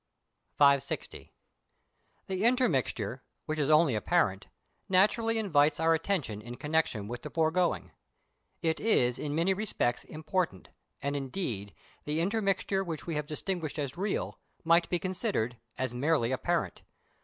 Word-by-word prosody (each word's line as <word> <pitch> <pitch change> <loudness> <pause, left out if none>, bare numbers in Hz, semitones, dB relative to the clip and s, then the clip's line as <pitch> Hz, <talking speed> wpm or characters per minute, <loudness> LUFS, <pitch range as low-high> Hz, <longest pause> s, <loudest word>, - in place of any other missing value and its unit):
560. 140 -2 +2 0.9
The 190 +1 -2
intermixture, 135 - +1 0.2
which 155 -1 -2
is 145 -1 +1
only 155 -3 +5
apparent, 105 - +1 0.4
naturally 220 +4 +3
invites 155 -8 +3
our 165 0 +4
attention 160 - -1
in 120 +2 -8
connexion 150 -8 0
with 120 +1 -5
the - - -6
foregoing; 160 - +1 0.7
it 160 -1 +1
is 125 - +2
in 145 -1 -3
many 170 +4 +3
respects 190 - -1
important, 160 - -2 0.3
and, 140 +1 -1
indeed, 130 - -4 0.3
the 150 +2 -1
intermixture 195 0 +1
which 165 -5 -5
we 170 - -3
have 150 -1 -2
distinguished 165 0 -3
as 140 -3 -3
real, 195 +3 -2 0.2
might 165 +1 +4
be 175 - +1
considered 185 - -2 0.2
as 130 -2 -2
merely 130 -1 +1
apparent. 170 +6 -1
160 Hz, 130 wpm, -30 LUFS, 130-185 Hz, 0.9 s, only